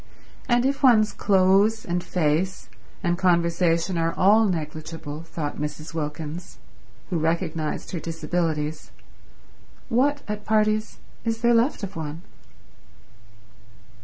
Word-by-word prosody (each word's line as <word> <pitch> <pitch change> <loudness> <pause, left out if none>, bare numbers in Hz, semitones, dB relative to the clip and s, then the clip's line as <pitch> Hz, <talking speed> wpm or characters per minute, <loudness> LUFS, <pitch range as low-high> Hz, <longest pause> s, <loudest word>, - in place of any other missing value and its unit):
And 240 +1 +3
if 275 +1 0
one's 220 -6 +5
clothes 200 +3 +3
and 175 0 -1
face 175 +2 -1 0.3
and 175 -1 0
conversation 170 0 +2
are 165 0 0
all 210 +4 +5
negligible, 155 -3 -4
thought 160 -3 -5
Mrs. 150 +2 -5
Wilkins, 155 +2 -5 0.5
who 170 - +1
recognized 160 -1 -2
her 175 - -3
disabilities, 160 -1 -2 1.0
what, 280 +5 +2
at 210 0 -4
parties, 215 0 +1 0.3
is 225 -1 -2
there 240 0 +4
left 235 0 +2
of 200 -1 -5
one? 160 +1 -5
175 Hz, 110 wpm, -24 LUFS, 160-215 Hz, 1.0 s, one's